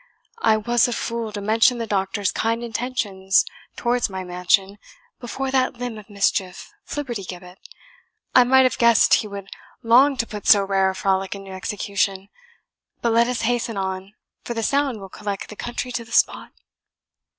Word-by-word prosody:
"I 220 Hz, -1 st, +4 dB
was 240 Hz, +3 st, +2 dB
a 245 Hz, -, -2 dB
fool 230 Hz, -1 st, -3 dB
to 205 Hz, -1 st, -5 dB
mention 225 Hz, +4 st, +3 dB
the 230 Hz, -, -3 dB
doctor's 195 Hz, -1 st, -1 dB
kind 230 Hz, +1 st, -1 dB
intentions 220 Hz, -5 st, 0 dB, 0.3 s
towards 240 Hz, -1 st, 0 dB
my 190 Hz, -1 st, -5 dB
mansion 185 Hz, +3 st, 0 dB, 0.4 s
before 265 Hz, +2 st, -4 dB
that 260 Hz, -1 st, +1 dB
limb 240 Hz, -2 st, -5 dB
of 210 Hz, -, -15 dB
mischief, 195 Hz, -2 st, -1 dB
Flibbertigibbet; 195 Hz, -9 st, -6 dB, 0.7 s
I 250 Hz, -, +7 dB
might 265 Hz, +2 st, +5 dB
have 255 Hz, -, +1 dB
guessed 235 Hz, -2 st, +5 dB
he 215 Hz, -, +3 dB
would 200 Hz, -1 st, -8 dB, 0.3 s
long 260 Hz, +5 st, +5 dB
to 230 Hz, -, 0 dB
put 210 Hz, -2 st, -8 dB
so 200 Hz, -2 st, +7 dB
rare 195 Hz, -1 st, +2 dB
a 190 Hz, -, -4 dB
frolic 190 Hz, 0 st, 0 dB
into 195 Hz, -1 st, -10 dB
execution. 195 Hz, 0 st, -2 dB, 0.7 s
But 235 Hz, -, +2 dB
let 235 Hz, +1 st, +4 dB
us 250 Hz, -1 st, -2 dB
hasten 230 Hz, -1 st, -1 dB
on, 190 Hz, +1 st, -4 dB, 0.3 s
for 235 Hz, -, -5 dB
the 225 Hz, -, -2 dB
sound 275 Hz, -2 st, 0 dB
will 195 Hz, -, -9 dB
collect 200 Hz, 0 st, -5 dB
the 210 Hz, -, -9 dB
country 240 Hz, +3 st, -5 dB
to 240 Hz, -, -3 dB
the 230 Hz, -, -17 dB
spot." -, -, +2 dB
215 Hz, 170 wpm, -22 LUFS, 195-240 Hz, 0.7 s, I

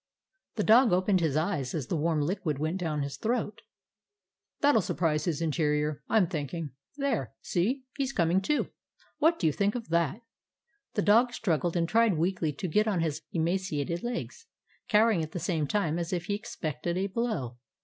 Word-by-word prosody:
The -, -, 0 dB
dog 230 Hz, +2 st, +6 dB
opened 185 Hz, +1 st, +3 dB
his 155 Hz, -4 st, +1 dB
eyes 155 Hz, -6 st, -1 dB
as 150 Hz, -6 st, -2 dB
the 170 Hz, -, -2 dB
warm 160 Hz, 0 st, +1 dB
liquid 165 Hz, -3 st, -1 dB
went 155 Hz, +6 st, -2 dB
down 155 Hz, -5 st, -1 dB
his 140 Hz, 0 st, -5 dB
throat. 225 Hz, -2 st, -2 dB, 1.0 s
"That 290 Hz, 0 st, +5 dB
'll 220 Hz, -, +5 dB
surprise 155 Hz, -3 st, 0 dB
his 165 Hz, -1 st, -1 dB
interior, 150 Hz, -2 st, 0 dB
I -, -, +3 dB
'm 205 Hz, -, +5 dB
think 155 Hz, -3 st, -4 dB
ing. 165 Hz, -4 st, -4 dB, 0.3 s
There, 255 Hz, -, -1 dB
see! 240 Hz, +10 st, 0 dB, 0.2 s
He's 270 Hz, -1 st, 0 dB
coming 175 Hz, -4 st, +2 dB
to. 295 Hz, +10 st, 0 dB, 0.5 s
What 330 Hz, +2 st, +4 dB
do -, -, -2 dB
you 155 Hz, -, +3 dB
think 200 Hz, -, +1 dB
of 235 Hz, -6 st, -5 dB
that?" 170 Hz, -, +1 dB, 0.7 s
The 205 Hz, -, +1 dB
dog 235 Hz, +4 st, +4 dB
struggled 175 Hz, -6 st, 0 dB
and 165 Hz, -1 st, +1 dB
tried 225 Hz, -3 st, +3 dB
weakly 170 Hz, -1 st, 0 dB
to 150 Hz, +6 st, -5 dB
get 210 Hz, +6 st, +2 dB
on 195 Hz, -6 st, +1 dB
his 155 Hz, -1 st, -1 dB
emaciated 170 Hz, -2 st, -1 dB
legs, 245 Hz, -, -5 dB, 0.4 s
cowering 215 Hz, -4 st, +4 dB
at 155 Hz, 0 st, -5 dB
the 175 Hz, -, -3 dB
same 160 Hz, -3 st, -1 dB
time, 170 Hz, -3 st, 0 dB
as 170 Hz, -1 st, -3 dB
if 175 Hz, -2 st, -2 dB
he 205 Hz, -, -1 dB
expected 175 Hz, -6 st, -3 dB
a 190 Hz, -, 0 dB
blow. 190 Hz, -, -2 dB
175 Hz, 190 wpm, -29 LUFS, 155-210 Hz, 1.0 s, dog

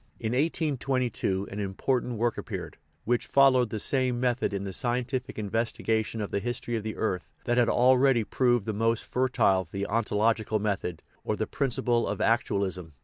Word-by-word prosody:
In 110 Hz, -1 st, -2 dB
1822 130 Hz, -, 0 dB
an 100 Hz, -, -5 dB
important 120 Hz, +5 st, -1 dB
work 120 Hz, +1 st, +1 dB
appeared, -, -, -6 dB, 0.3 s
which 120 Hz, +1 st, 0 dB
followed 130 Hz, -3 st, +5 dB
the 110 Hz, -, -3 dB
same 130 Hz, 0 st, +1 dB
method 125 Hz, -1 st, 0 dB
in 100 Hz, -1 st, -3 dB
the 95 Hz, -1 st, -5 dB
scientific 125 Hz, +3 st, -2 dB
investigation 110 Hz, +1 st, -1 dB
of 105 Hz, -, -4 dB
the -, -, 0 dB
history 120 Hz, +1 st, -3 dB
of 110 Hz, -, -1 dB
the 110 Hz, +1 st, -5 dB
earth 95 Hz, -5 st, -2 dB, 0.2 s
that 120 Hz, 0 st, +2 dB
had 120 Hz, -1 st, +3 dB
already 130 Hz, -1 st, +4 dB
proved 120 Hz, -1 st, +1 dB
the 110 Hz, -, -2 dB
most 115 Hz, +2 st, +1 dB
fertile 115 Hz, -8 st, +1 dB
the 100 Hz, 0 st, -2 dB
ontological 110 Hz, 0 st, +1 dB
method, 100 Hz, -5 st, -2 dB, 0.2 s
or -, -, -1 dB
the -, -, -1 dB
principle 120 Hz, -3 st, 0 dB
of -, -, -3 dB
"act 115 Hz, +1 st, +2 dB
ualism." 90 Hz, -5 st, -2 dB
115 Hz, 170 wpm, -28 LUFS, 105-125 Hz, 0.3 s, followed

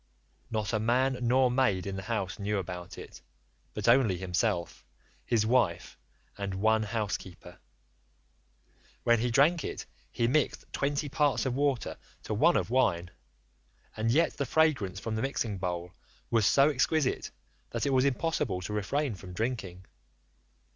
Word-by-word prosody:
Not 110 Hz, -1 st, -2 dB
a 110 Hz, -, +2 dB
man 125 Hz, +4 st, +1 dB
nor 125 Hz, +1 st, +3 dB
maid 120 Hz, -8 st, +1 dB
in 100 Hz, -1 st, -4 dB
the 95 Hz, -, -4 dB
house 100 Hz, -3 st, -3 dB
knew 105 Hz, +1 st, -1 dB
about 90 Hz, -1 st, -6 dB
it, -, -, -10 dB, 0.5 s
but -, -, -3 dB
only 115 Hz, -6 st, +4 dB
himself, 90 Hz, -2 st, -1 dB, 0.4 s
his 110 Hz, -2 st, +2 dB
wife, 115 Hz, -7 st, +1 dB, 0.4 s
and 100 Hz, -1 st, -3 dB
one 110 Hz, +3 st, +3 dB
housekeeper: 105 Hz, -4 st, -4 dB, 1.4 s
when 120 Hz, -1 st, +4 dB
he 120 Hz, +2 st, 0 dB
drank 145 Hz, +7 st, +3 dB
it -, -, -5 dB, 0.3 s
he 115 Hz, -, 0 dB
mixed 145 Hz, +4 st, 0 dB
twenty 145 Hz, +1 st, -1 dB
parts 145 Hz, -1 st, +1 dB
of 130 Hz, -, 0 dB
water 140 Hz, -2 st, 0 dB, 0.3 s
to -, -, -3 dB
one -, -, +4 dB
of -, -, -2 dB
wine, 90 Hz, -9 st, +1 dB, 0.8 s
and 110 Hz, +1 st, -1 dB
yet 160 Hz, +8 st, +2 dB
the 140 Hz, -, -1 dB
fragrance 125 Hz, -, +2 dB
from 110 Hz, +2 st, -4 dB
the 110 Hz, -, -2 dB
mixing 115 Hz, -7 st, -2 dB
bowl 90 Hz, -1 st, -4 dB, 0.4 s
was 115 Hz, -4 st, +3 dB
so 140 Hz, +2 st, +5 dB
exquisite 145 Hz, +1 st, 0 dB, 0.4 s
that -, -, -2 dB
it 140 Hz, -, +1 dB
was 130 Hz, -1 st, +4 dB
impossible 140 Hz, -, 0 dB
to 100 Hz, +3 st, -5 dB
refrain 130 Hz, +6 st, -1 dB
from 95 Hz, -2 st, -10 dB
drinking. 95 Hz, -4 st, -4 dB
115 Hz, 150 wpm, -29 LUFS, 95-130 Hz, 1.4 s, so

